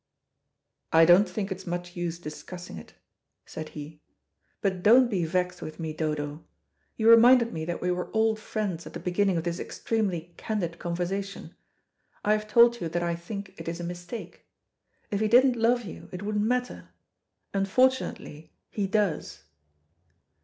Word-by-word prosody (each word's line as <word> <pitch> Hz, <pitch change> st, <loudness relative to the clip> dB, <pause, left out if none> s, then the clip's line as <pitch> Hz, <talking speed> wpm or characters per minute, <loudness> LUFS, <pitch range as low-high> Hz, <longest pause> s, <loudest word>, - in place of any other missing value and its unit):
"I 165 Hz, 0 st, +7 dB
don't 180 Hz, +4 st, +6 dB
think 195 Hz, +1 st, -4 dB
it's 190 Hz, 0 st, -6 dB
much 175 Hz, 0 st, -4 dB
use 175 Hz, -1 st, -3 dB
discussing 175 Hz, -, -8 dB
it," -, -, -15 dB, 0.5 s
said 155 Hz, -1 st, -7 dB
he. 150 Hz, +1 st, -9 dB, 0.6 s
"But 190 Hz, -3 st, -1 dB
don't 240 Hz, +5 st, +6 dB
be 180 Hz, -5 st, 0 dB
vexed 180 Hz, +2 st, -1 dB
with 155 Hz, +2 st, -8 dB
me, 160 Hz, -2 st, -3 dB
Dodo. 150 Hz, -1 st, -3 dB, 0.5 s
You 220 Hz, -, +1 dB
reminded 235 Hz, +1 st, +7 dB
me 160 Hz, -1 st, -4 dB
that 175 Hz, +1 st, -4 dB
we 180 Hz, -, +1 dB
were 180 Hz, 0 st, -3 dB
old 220 Hz, 0 st, +2 dB
friends 205 Hz, -6 st, -3 dB
at -, -, -11 dB
the -, -, -5 dB
beginning 185 Hz, +1 st, +1 dB
of 165 Hz, -, -1 dB
this 170 Hz, 0 st, -3 dB
extremely 180 Hz, -7 st, -2 dB
candid 175 Hz, -6 st, -3 dB
conversation. 185 Hz, +3 st, -4 dB, 0.7 s
I 210 Hz, -, +3 dB
have 215 Hz, 0 st, +1 dB
told 235 Hz, +2 st, +5 dB
you 165 Hz, -, -2 dB
that 175 Hz, +1 st, -1 dB
I 170 Hz, 0 st, 0 dB
think 195 Hz, +3 st, -7 dB
it -, -, -8 dB
is 170 Hz, +1 st, -3 dB
a -, -, -5 dB
mistake. 175 Hz, +5 st, -7 dB, 0.6 s
If 200 Hz, -, 0 dB
he 215 Hz, -, +2 dB
didn't 250 Hz, +3 st, +5 dB
love 240 Hz, +1 st, +2 dB
you 185 Hz, -, -9 dB
it 180 Hz, +2 st, -6 dB
wouldn't 210 Hz, 0 st, 0 dB
matter. 250 Hz, +2 st, -2 dB, 0.6 s
Unfortunately 195 Hz, -, 0 dB, 0.2 s
he 205 Hz, -2 st, -1 dB
does." 190 Hz, -, -1 dB
185 Hz, 160 wpm, -27 LUFS, 170-215 Hz, 0.7 s, I